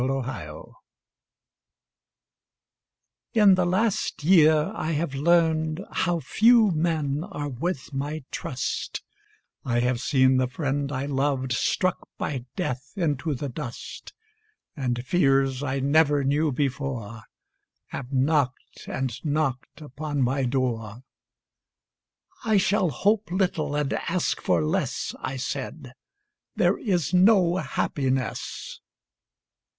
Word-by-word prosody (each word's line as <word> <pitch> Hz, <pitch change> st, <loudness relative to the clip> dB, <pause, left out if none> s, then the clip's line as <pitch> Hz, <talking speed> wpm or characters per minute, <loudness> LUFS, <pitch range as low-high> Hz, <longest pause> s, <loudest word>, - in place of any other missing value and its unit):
Red 135 Hz, 0 st, -1 dB
Maples 75 Hz, -13 st, -7 dB, 2.6 s
In 210 Hz, -3 st, +7 dB
the 185 Hz, -1 st, +2 dB
last 200 Hz, -3 st, 0 dB
year 155 Hz, -3 st, +5 dB
I 160 Hz, -, -2 dB
have 150 Hz, -1 st, -1 dB
learned 160 Hz, +2 st, +2 dB
How 175 Hz, 0 st, 0 dB
few 225 Hz, +4 st, +4 dB
men 155 Hz, -3 st, 0 dB
are 145 Hz, -7 st, -5 dB
worth 145 Hz, +2 st, -4 dB
my 145 Hz, +2 st, -3 dB
trust; 125 Hz, -1 st, -4 dB, 0.6 s
I 120 Hz, -2 st, +1 dB
have 125 Hz, 0 st, 0 dB
seen 130 Hz, 0 st, +3 dB
the 130 Hz, 0 st, +2 dB
friend 140 Hz, +1 st, -2 dB
I 135 Hz, 0 st, -2 dB
loved 135 Hz, -2 st, -1 dB
Struck 185 Hz, +9 st, 0 dB
by 130 Hz, -4 st, -3 dB
death 130 Hz, +3 st, -4 dB
into 155 Hz, -4 st, -1 dB
the 140 Hz, +3 st, -4 dB
dust, 125 Hz, -2 st, -7 dB, 0.6 s
And 125 Hz, -3 st, -2 dB
fears 135 Hz, -5 st, +2 dB
I 135 Hz, -1 st, -1 dB
never 145 Hz, +1 st, +3 dB
knew 145 Hz, +3 st, +1 dB
before 130 Hz, -5 st, -3 dB, 0.7 s
Have 130 Hz, -1 st, -6 dB
knocked 135 Hz, -1 st, 0 dB
and 130 Hz, -2 st, -3 dB
knocked 150 Hz, -2 st, -2 dB
upon 145 Hz, 0 st, -3 dB
my 130 Hz, +2 st, +1 dB
door 120 Hz, -3 st, -2 dB, 1.4 s
"I 220 Hz, -3 st, +3 dB
shall 195 Hz, -1 st, +2 dB
hope 205 Hz, -, +1 dB
little 180 Hz, -5 st, 0 dB
and 145 Hz, -2 st, 0 dB
ask 175 Hz, +1 st, -1 dB
for -, -, +2 dB
less," 155 Hz, -6 st, -1 dB
I 135 Hz, -, -4 dB
said, 130 Hz, +1 st, -5 dB, 0.6 s
"There -, -, +2 dB
is 180 Hz, -, 0 dB
no 185 Hz, -2 st, +5 dB
happiness." 135 Hz, -7 st, -2 dB
145 Hz, 115 wpm, -25 LUFS, 130-170 Hz, 2.6 s, In